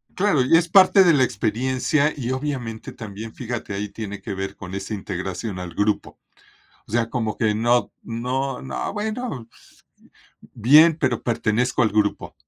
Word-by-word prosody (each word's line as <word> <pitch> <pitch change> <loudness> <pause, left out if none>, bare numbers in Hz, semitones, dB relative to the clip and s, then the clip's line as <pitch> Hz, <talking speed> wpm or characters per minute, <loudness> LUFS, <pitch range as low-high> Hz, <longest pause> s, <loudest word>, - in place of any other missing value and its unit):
Claro, 185 -9 +2
y 145 - +4
es 170 0 0
parte 190 +1 +7
de 175 - +5
la 135 -3 +4
experiencia 130 +6 0
y, 125 -4 -4
obviamente, 130 -5 -4
también, 110 -1 -8
fíjate, 120 -4 -5
ahí 100 +1 -3
tiene 105 -2 -7
que 100 0 -5
ver 95 +1 -4
con 95 -1 -8
esa 100 +2 -5
integración 95 0 -4
al 90 -2 -6
grupo, 105 +4 -1 0.7
o - - -14
sea, 115 0 +1
como 110 -3 -2
que 110 -2 +1
no 120 +3 +1
no 125 +4 -3
no, 135 - -4
bueno, 215 - -4
pues, - - -22 0.9
bien, 150 +8 +6
pero 120 -3 +1
pertenezco 120 +1 0
al 110 - +4
grupo. 105 -1 0
115 Hz, 165 wpm, -22 LUFS, 105-135 Hz, 0.9 s, parte